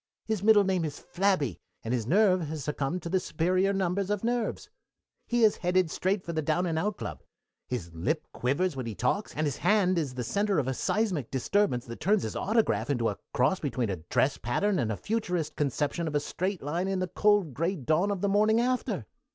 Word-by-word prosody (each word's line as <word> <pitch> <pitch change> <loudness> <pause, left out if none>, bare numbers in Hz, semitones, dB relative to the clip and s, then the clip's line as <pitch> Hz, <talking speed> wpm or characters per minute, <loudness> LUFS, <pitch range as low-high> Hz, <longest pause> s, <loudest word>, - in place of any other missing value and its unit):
His 220 -4 -1
middle 210 0 +6
name 190 -3 +1
is 150 -2 -4
Flabby, 180 - 0 0.2
and 115 - -2
his 115 -3 -1
nerve 185 - +3
has 155 -1 -5
succumbed 150 +5 -2
to 170 - -4
the 185 +2 +2
superior 185 +3 +1
numbers 195 0 0
of 210 0 -1
nerves. 240 - -1 0.6
"He 240 -1 +2
is 215 - +5
headed 180 -2 +1
straight 190 +1 0
for 170 - -5
the 160 - 0
Down 160 +4 +1
and 165 -2 0
Out 205 +4 -1
Club. 75 -5 -6 0.5
His 95 -10 -4
lip 150 - -1
quivers 145 +7 0
when 130 -3 -4
he 110 - -5
talks, 205 - -1
and 155 - 0
his 145 -3 -2
hand 185 -4 +3
is 140 -5 -3
the 125 - -3
center 200 - 0
of 140 -4 +1
a 130 - 0
seismic 185 - -1
disturbance 135 - +1
that 115 0 -8
turns 200 +3 +2
his - - -4
autograph 165 - +1
into 120 -5 +1
a 100 - -5
cross 130 +10 +2
between 125 -6 -1
a 95 - -3
dress 90 - 0
pattern 190 - 0
and 115 -4 0
a 105 - -3
futurist 180 -8 -2
conception 145 +3 -1
of 150 - -3
a - - +4
straight 185 +4 -3
line 170 +6 -1
in 195 0 0
the 185 0 -1
cold 205 -4 +2
gray 170 +8 0
dawn 160 +6 +1
of 200 -3 -2
the 200 - +1
morning 215 +3 +3
after. 245 - -1
175 Hz, 215 wpm, -28 LUFS, 135-200 Hz, 0.6 s, middle